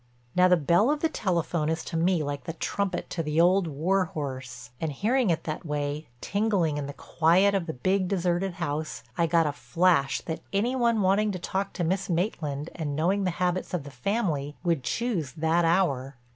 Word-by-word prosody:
Now 180 0 +6
the 180 0 +5
bell 170 - +3
of 300 0 0
the 325 - +2
telephone 170 - -1
is 160 0 -2
to 165 - -5
me 170 0 +2
like 145 0 -4
the 165 - -4
trumpet 190 +2 -2
to 170 - -1
the 150 0 -1
old 180 +1 +4
war 180 +6 +1
horse. 130 -6 -6
And 160 -2 -1
hearing 225 - +1
it 165 - 0
that 155 -1 -4
way, 150 -1 -3
tingling 200 -7 +1
in 145 -1 -3
the 140 - -6
quiet 175 +7 +3
of 190 -4 0
the 160 - -3
big, 185 +8 +1
deserted 180 0 0
house, 155 -3 -3
I 170 - +2
got 165 0 +3
a 150 - +1
flash 165 -2 +2
that 160 -1 -5
any 225 +6 +1
one 235 -4 +2
wanting 205 +3 +3
to - - -3
talk 195 +3 -2
to 175 - -2
Miss 190 +4 -1
Maitland 165 -5 -2
and 150 -4 -3
knowing 190 +6 +1
the - - +2
habits 180 0 -1
of 165 - -3
the 145 - -9
family 150 - -1
would 165 -7 +1
choose 175 - -2
that 165 +2 +2
hour. 145 -7 +1
170 Hz, 200 wpm, -27 LUFS, 150-190 Hz, -, Now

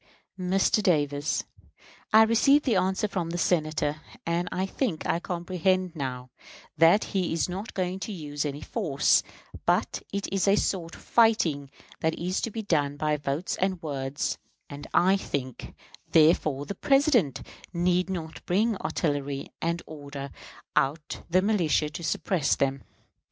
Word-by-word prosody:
Mr. 190 +3 +2
Davis: 145 -6 +1 0.7
I 220 +1 +8
receive 275 +6 +4
the 240 -6 +2
answer 190 +2 +1
from 185 -5 -3
the 175 - -3
Senator, 155 -3 0 0.2
and 170 +1 -1
I 185 - -1
think 195 - -2
I 170 - +1
comprehend 180 +1 -1
now 130 -3 -5 0.4
that 165 +6 +5
he 185 -3 0
is 165 - +1
not 190 +5 -6
going 185 0 -1
to 215 - -5
use 145 -6 -4
any 145 0 -4
force, 155 -11 +2 0.4
but - - +1
it 200 0 -2
is 195 0 +1
a 195 - +6
sort 175 -5 -1
of - - -15
fighting 170 - +3 0.3
that 160 0 0
is 180 +2 -1
to - - -1
be 220 0 -5
done 145 -7 0
by 150 0 +1
votes 145 +4 -2
and 185 -1 0
words; 140 -2 -3 0.3
and 145 0 -8
I 190 +2 +4
think, 130 -9 -5 0.4
therefore, 155 -3 +4
the 200 - -4
President 270 - +2 0.3
need 180 +1 +1
not 165 -4 -5
bring 210 +4 +2
artillery 145 -5 -2
and 170 +1 -1
order 140 -3 -8 0.4
out 150 +3 0
the 185 +2 +3
militia 170 -7 +1
to 170 - -7
suppress 165 0 +1
them. 135 0 0
170 Hz, 150 wpm, -27 LUFS, 145-190 Hz, 0.7 s, I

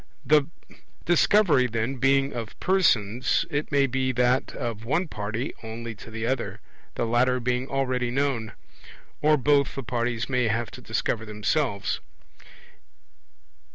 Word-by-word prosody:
The 150 -2 +4 0.6
Discovery, 175 -6 +4
then, 115 +3 -2
being 135 +2 +2
of 115 -3 -6
persons, 125 - +2
it 145 +2 -2
may 140 -1 +4
be 130 0 0
that 125 +1 +2
of 115 -2 -4
one 165 +10 0
party 110 0 -4
only 115 +1 -6
to 110 - -12
the 110 0 -4
other, 125 0 -2 0.4
the - - 0
latter 125 +2 +2
being 125 +1 -1
already 130 -3 -1
known; 125 -4 -1 0.7
or 150 0 +4
both 140 +1 +2
the 135 - -4
parties 120 -1 -2
may 125 -3 +1
have 115 +1 -1
to - - -10
discover 110 - -2
themselves. 105 +1 -1
125 Hz, 135 wpm, -26 LUFS, 115-135 Hz, 0.7 s, The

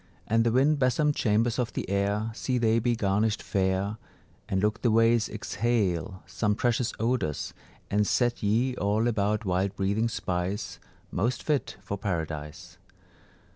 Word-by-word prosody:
And 115 +1 +2
the 115 - +2
wind 140 +5 +3
besomed 145 +3 +2
chambers 115 +2 +1
of 120 -2 -1
the - - -3
air, 100 +3 0
See 125 +2 -1
they 115 -1 +3
be 120 +1 +1
garnished 105 +1 0
fair; 95 +2 0 0.5
And 95 - +1
look 105 +3 0
the 120 - +3
ways 115 0 +3
exhale 100 -5 -1
some 105 +4 0
precious 120 +1 +1
odours, 115 - -1 0.4
And 105 0 +2
set 120 -1 +1
ye 115 +5 +1
all 105 +3 +1
about 105 -1 0
wild 95 +2 0
breathing 100 +4 0
spice, 90 -2 -3 0.3
Most 115 +7 -1
fit 150 -3 -1
for 100 - -4
Paradise. 80 -6 -4
110 Hz, 145 wpm, -27 LUFS, 100-120 Hz, 0.5 s, wind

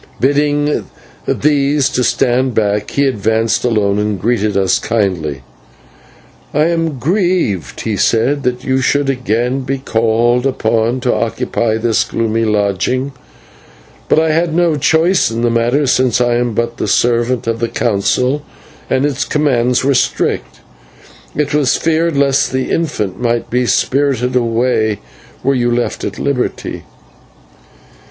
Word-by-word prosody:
Bidding 145 +2 +1 0.4
these 145 -1 +2
to 125 - -1
stand 125 0 +1
back, 105 -1 0
he 140 - +1
advanced 110 -3 0
alone 105 -4 +1
and 105 -2 -1
greeted 105 0 0
us 95 -1 +2
kindly. 90 - -2 1.1
"I 150 - +3
am 165 -4 -1
grieved," 165 - -1
he 110 -3 -2
said, 125 +8 +1
"that 125 -1 -2
you 130 0 0
should 140 +1 +1
again 125 0 -1
be 135 +1 -2
called 120 +1 +1
upon 115 -1 0
to 125 -1 +1
occupy 110 0 -1
this 115 0 +1
gloomy 115 0 -1
lodging; 105 +6 0 1.0
but - - +3
I 160 0 +3
had 165 0 0
no 170 -2 +2
choice 160 +6 +2
in 115 +1 -3
the 120 - +2
matter, 120 +5 +1
since 125 -2 +2
I 120 -1 +2
am 120 -2 -1
but 115 +1 -2
the - - -2
servant 120 +1 +1
of 115 0 -2
the 115 0 -1
Council, 120 +5 0 0.5
and 130 +1 +1
its 145 -1 -1
commands 125 -5 +1
were 140 +1 +2
strict. 130 - -1 0.7
It 150 -1 -1
was 145 -3 +2
feared 165 -1 0
lest 140 -1 +2
the 130 0 -2
infant 105 - -2
might 120 -1 -1
be 125 0 +1
spirited 130 -2 +1
away, 115 -2 +1 0.5
were 135 - +2
you 120 -2 +1
left 120 0 -1
at - - -4
liberty." 140 -3 -3
125 Hz, 140 wpm, -15 LUFS, 115-140 Hz, 1.1 s, I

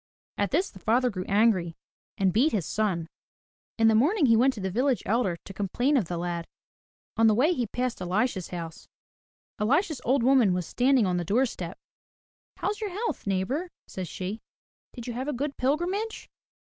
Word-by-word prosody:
At 205 - +1
this 350 +7 0
the 190 - -13
father 245 +5 +2
grew 185 -3 -5
angry 195 -5 +2 0.4
and 190 -2 +2
beat 255 +7 +3
his 195 -7 0
son. 190 -7 -1 0.7
In 225 -1 +4
the 225 - +5
morning 295 - +3
he 230 -3 +5
went 255 +4 +4
to - - -7
the 190 -1 -2
village 250 +4 +1
elder 205 -5 +1
to 195 - -9
complain 240 +9 0
of 240 -8 +2
the 175 +1 -4
lad. 170 -1 -3 0.7
On 225 0 +5
the 215 - +4
way 295 +10 +3
he 245 -7 -1
passed 250 0 -3
Elisha's 185 +1 0
house. 165 -2 -7 0.7
Elisha's 290 - +1
old 260 +1 +2
woman 245 -8 +4
was 180 -2 -2
standing 255 - +3
on 180 -1 0
the 175 - -1
doorstep. 200 -3 -1 0.8
"How's 415 +2 -2
your 425 - -2
health, 415 - -4
neighbor," 200 - -1 0.2
says 185 -2 -6
she. 195 +6 -5 0.5
"Did 240 -3 -8
you 245 - -4
have 255 +4 -4
a 295 - -1
good 280 +3 -3
pilgrimage?" 355 - -1
225 Hz, 185 wpm, -27 LUFS, 190-270 Hz, 0.8 s, the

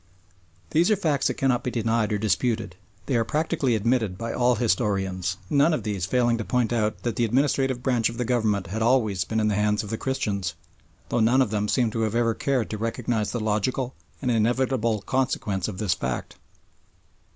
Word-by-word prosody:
These 170 +5 +3
are 215 - +4
facts 155 -8 +1
that - - -1
cannot 125 -2 +1
be - - -1
denied 115 -2 0
or 105 - +1
disputed. 110 -1 0 0.3
They 135 - -1
are 115 - +2
practically 150 -1 0
admitted 110 -3 0
by 115 +2 -4
all 125 0 +3
historians, 95 -5 0
none 145 - +3
of 120 - -4
these 100 -5 -2
failing 120 +1 +2
to - - -2
point 120 0 0
out 110 -2 -1
that 120 - -2
the 120 - +2
administrative 130 +1 +1
branch 125 -4 +2
of 115 - -8
the 125 - -1
government 110 -5 +1
has 110 +6 -4
always 110 -6 +2
been 110 - -1
in 110 - +2
the 105 - +1
hands 105 +1 +1
of 105 - -7
the 110 - -3
Christians, 100 -9 -2 0.5
though - - +1
none 115 +4 +4
of 130 -6 +2
them 105 -1 0
seem 120 0 +1
to 115 - -2
have 110 0 0
ever 115 -1 +2
cared 130 -2 -1
to 110 - -4
recognise 115 -1 -1
the 120 - -2
logical 110 +4 -1 0.3
and 125 - +1
inevitable 115 -1 +1
consequence 105 -7 -1
of 105 -4 -6
this 95 -3 +1
fact. 65 -6 -4
115 Hz, 200 wpm, -25 LUFS, 105-125 Hz, 0.5 s, are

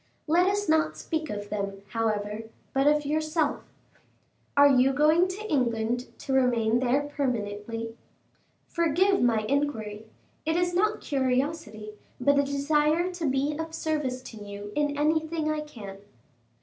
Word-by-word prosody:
Let 345 +4 +3
us 410 +1 0
not 315 +1 +2
speak 315 -2 -3
of 205 0 -5
them, 200 -1 -3
however; 215 -1 -2 0.3
but 270 +1 +2
of 300 0 +3
yourself. 310 +1 0 1.0
Are 285 0 +8
you 265 -1 +4
going 310 +6 +4
to 405 +4 -6
England 240 - 0
to 270 - -3
remain 240 -3 +3
there 260 +3 +2
permanently? 230 -5 -3 0.7
Forgive 350 +4 +2
my 230 -3 +3
inquiry: 220 -5 -2 0.4
it 320 +1 0
is 350 0 +1
not 425 +4 +1
curiosity, 260 -5 -1 0.3
but 280 +3 +3
a - - +4
desire 300 +5 +1
to 340 -4 -2
be 275 +3 0
of 320 0 -4
service 295 -6 -2
to 225 - -10
you 205 0 -8
in 290 -1 0
anything 315 +1 +1
I 310 - -1
can." 210 -10 -9
280 Hz, 140 wpm, -27 LUFS, 225-315 Hz, 1.0 s, Are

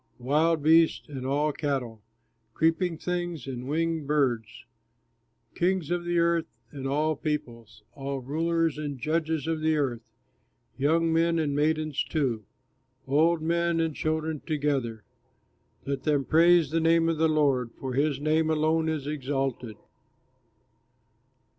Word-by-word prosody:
Wild 150 +5 +1
beasts 160 +1 +4
and 130 -3 -5
all 145 +3 +1
cattle, 135 -7 -3 0.5
Creeping 165 +1 +1
things 175 -4 -3
and 130 -2 -6
winged 165 -1 -1
birds! 130 -5 -1 0.9
Kings 180 -2 0
of 175 0 -1
earth 170 -1 +2 0.2
and 135 -2 -5
all 155 +3 +1
peoples, 120 -8 -5
All 140 -1 -4
rulers 165 +3 -1
and 145 -2 -4
judges 160 +2 -1
of 160 -1 -2
earth, 140 -7 0 0.7
Young 160 +4 +2
men 165 +1 +2
and 150 -3 0
maidens 155 0 0
too, 125 -9 -2 0.6
Old 155 +4 +2
men 170 0 +1
and 160 -2 -1
children 155 -1 -2
together! 140 -9 -2 0.8
Let 140 -1 -2
them 145 -3 +1
praise 165 -2 +4
the 165 - +1
name 165 0 +3
of 165 -2 0
the 160 0 +3
Lord, 140 -6 +2
For 130 -1 -4
his 140 +1 +1
name 155 +2 +1
alone 160 +1 +1
is 155 -3 -3
exalted. 135 -5 -3
155 Hz, 130 wpm, -27 LUFS, 135-165 Hz, 0.9 s, beasts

